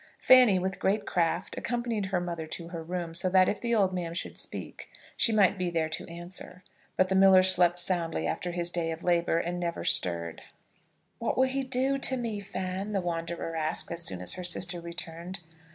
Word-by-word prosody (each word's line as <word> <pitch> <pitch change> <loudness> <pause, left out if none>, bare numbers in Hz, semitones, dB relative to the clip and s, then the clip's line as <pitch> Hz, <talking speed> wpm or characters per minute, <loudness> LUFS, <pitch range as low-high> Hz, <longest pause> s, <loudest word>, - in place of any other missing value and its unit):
Fanny, 250 -7 +6
with 185 0 -2
great 200 +2 +1
craft, 170 0 -1
accompanied 235 -4 -2
her 190 -2 0
mother 170 -2 -4
to 165 +1 -7
her 170 -2 -6
room, 170 0 -4
so 180 +2 -1
that 185 0 +5
if 210 - -1
the 235 -1 +1
old 195 -3 +2
man 170 -2 -3
should - - -5
speak - - -7 0.3
she 230 - +3
might 205 -3 +3
be 180 -1 0
there 165 -2 -1
to 155 - -3
answer; 180 +1 -7 0.3
but 185 - +4
the 190 - -1
miller 190 -1 +7
slept 175 -2 +4
soundly 170 - -1
after 175 - -2
his 175 0 -2
day 170 -2 -1
of 165 0 -5
labour, 170 -1 +2
and 175 +1 -2
never 170 -1 -3
stirred. 85 -2 -1 0.8
"What 230 - -1
will 260 - +5
he 270 +1 -1
do 265 +1 0
to 265 -1 +3
me, 230 -4 -3
Fan?" 190 +1 -4
the 195 - +1
wanderer 170 -1 -4
asked 160 +1 -2
as 170 0 -1
soon 95 - +2
as - - 0
her 180 - -6
sister 175 0 +1
returned. 170 +2 -6
180 Hz, 200 wpm, -28 LUFS, 170-195 Hz, 0.8 s, miller